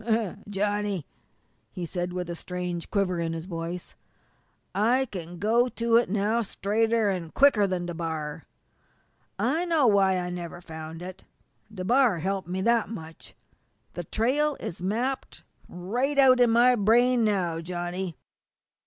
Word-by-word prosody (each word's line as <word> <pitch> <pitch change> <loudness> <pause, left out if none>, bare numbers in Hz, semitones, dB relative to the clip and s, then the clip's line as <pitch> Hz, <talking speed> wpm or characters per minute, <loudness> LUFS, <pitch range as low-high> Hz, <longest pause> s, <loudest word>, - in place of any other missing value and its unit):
"Johnny," 205 -3 -1 0.7
he 180 - -5
said, 175 +1 -3
with 180 -1 -4
a 170 - -4
strange 180 -1 -5
quiver 190 -4 0
in 165 -1 -1
his 165 0 -5
voice, 170 0 -5 0.8
"I 235 +7 +2
can 175 -6 -8
go 225 +6 +3
to 235 -1 0
it 240 - +2
now 215 +3 +1
straighter 220 +1 +1
an' 175 -4 -4
quicker 250 -8 +5
than 180 -2 -2
DeBar! 160 -3 -4 0.9
I 260 - +1
know 325 -5 +3
why 195 -4 +4
I 180 0 -3
never 175 -1 -6
found 160 0 -8
it. 185 0 -9 0.5
DeBar 220 +2 +2
helped 190 +1 -2
me 185 +1 -2
that 235 +2 +2
much. 165 -7 -9 0.6
The 175 - -5
trail 280 - +1
is 175 - -6
mapped 235 +8 -2 0.3
right 245 +11 -2
out 260 -2 +6
in 245 -1 +5
my 240 +2 +5
brain 240 +3 +4
now, 185 -6 0
Johnny. 175 +1 -4
195 Hz, 140 wpm, -27 LUFS, 175-230 Hz, 0.9 s, out